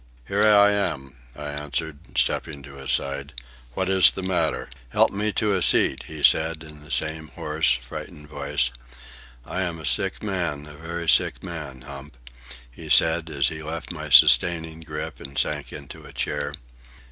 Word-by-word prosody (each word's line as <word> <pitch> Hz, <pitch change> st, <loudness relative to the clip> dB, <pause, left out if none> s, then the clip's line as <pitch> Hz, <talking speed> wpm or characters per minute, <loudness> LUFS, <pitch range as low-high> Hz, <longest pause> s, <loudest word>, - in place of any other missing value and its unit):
"Here 100 Hz, +1 st, 0 dB
I 105 Hz, -1 st, +6 dB
am," 70 Hz, -10 st, -2 dB, 0.2 s
I 75 Hz, 0 st, -6 dB
answered, 75 Hz, +1 st, -5 dB
stepping 70 Hz, -4 st, 0 dB
to 70 Hz, +1 st, -12 dB
his 65 Hz, -1 st, -4 dB
side. 70 Hz, 0 st, -1 dB, 0.4 s
"What 95 Hz, -, -1 dB
is 95 Hz, -3 st, +6 dB
the 95 Hz, -, -6 dB
matter?" 95 Hz, -1 st, 0 dB, 0.2 s
"Help -, -, +3 dB
me 105 Hz, +2 st, -1 dB
to 105 Hz, -2 st, +1 dB
a 95 Hz, -, 0 dB
seat," -, -, +2 dB
he 80 Hz, -2 st, -8 dB
said, 80 Hz, 0 st, +3 dB
in 75 Hz, -1 st, -12 dB
the 75 Hz, -, -15 dB
same 80 Hz, 0 st, -1 dB
hoarse, 75 Hz, -2 st, +1 dB
frightened 65 Hz, +4 st, -9 dB
voice. 75 Hz, -4 st, -1 dB, 0.7 s
"I 95 Hz, -, -3 dB
am 85 Hz, -3 st, -2 dB
a 80 Hz, -, -8 dB
sick 80 Hz, -, 0 dB
man; 85 Hz, -8 st, -2 dB
a 75 Hz, -, -11 dB
very 85 Hz, +3 st, -6 dB
sick -, -, +3 dB
man, 75 Hz, -8 st, -7 dB
Hump," 70 Hz, -1 st, -10 dB, 0.5 s
he -, -, -11 dB
said, 80 Hz, 0 st, +4 dB
as 70 Hz, -4 st, +2 dB
he 80 Hz, -1 st, -7 dB
left 80 Hz, +1 st, -6 dB
my 75 Hz, -3 st, -6 dB
sustaining 80 Hz, +5 st, +5 dB
grip 75 Hz, -1 st, -6 dB
and 70 Hz, 0 st, -9 dB
sank 75 Hz, -1 st, -1 dB
into -, -, -9 dB
a -, -, -14 dB
chair. 75 Hz, 0 st, -2 dB
80 Hz, 170 wpm, -24 LUFS, 70-85 Hz, 0.7 s, I